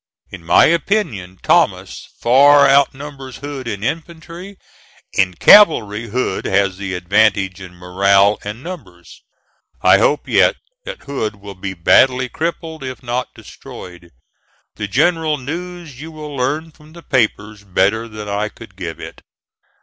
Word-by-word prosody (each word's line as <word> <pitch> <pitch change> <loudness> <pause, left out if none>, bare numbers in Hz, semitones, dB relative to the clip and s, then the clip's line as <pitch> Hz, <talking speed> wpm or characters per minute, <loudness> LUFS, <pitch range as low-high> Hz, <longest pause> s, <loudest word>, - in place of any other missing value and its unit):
In 95 -4 -10
my 85 - +5
opinion, 150 - -1
Thomas - - 0
far 140 +4 +5
outnumbers 135 -1 0
Hood 140 -2 -7
in 100 -3 -5
infantry. 170 - -6 0.6
In 90 -1 +1
cavalry, 115 - +5
Hood 120 -3 -2
has 95 -1 +1
the 95 -2 -4
advantage 95 0 +1
in 90 -1 -11
morale 100 +3 +2
and 105 +5 -7
numbers. 140 - -11 0.6
I - - +6
hope 150 - +1
yet - - +3 0.3
that - - -8
Hood 110 -7 -4
will 100 0 -11
be 95 0 -6
badly 125 +9 +3
crippled 160 -1 -5
if 130 -1 -7
not 125 +1 -3
destroyed. 90 -1 -12 0.7
The 105 - -4
general 160 - +1
news 165 0 -8
you 160 +1 -9
will 150 -2 -9
learn 150 +5 -2
from 150 +1 -19
the 170 0 -13
papers 105 -6 -1
better 100 +4 0
than 105 -1 -9
I 105 +1 -2
could 110 -4 -15
give 85 -4 -7
it. - - -10
120 Hz, 140 wpm, -17 LUFS, 100-150 Hz, 0.7 s, I